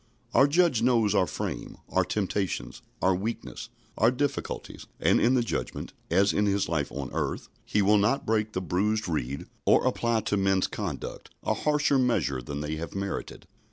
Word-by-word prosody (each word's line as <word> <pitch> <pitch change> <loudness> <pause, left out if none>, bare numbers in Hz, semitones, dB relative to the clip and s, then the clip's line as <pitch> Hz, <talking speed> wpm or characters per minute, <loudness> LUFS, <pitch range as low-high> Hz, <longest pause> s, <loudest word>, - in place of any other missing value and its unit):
Our 135 - +6
Judge 155 -6 +3
knows 115 -4 +3
our 95 -3 +3
frame, - - -5
our - - +2
temptations, 100 -2 -2 0.2
our 95 - +5
weakness, 105 +6 -4 0.3
our 115 - +6
difficulties; 140 +2 -3
and - - +3
in 125 +2 +4
the 125 - +3
Judgment, 115 - -4 0.2
as 100 +4 +3
in 105 0 +2
His 100 0 +1
life 75 -3 -1
on - - -5
earth, - - -2 0.2
He 105 - +1
will 105 +1 +5
not 110 +7 +1
break 110 -1 0
the 95 - -1
bruised 105 +4 0
reed, 70 -5 -2 0.2
or - - +4
apply 115 -1 +1
to 105 - 0
men's 95 -1 +2
conduct - - -5
a - - +1
harsher 150 -2 +2
measure 115 - +1
than 70 +4 -5
they 75 +1 -3
have 85 +4 -6
merited. 100 0 -4
105 Hz, 175 wpm, -27 LUFS, 95-120 Hz, 0.3 s, Our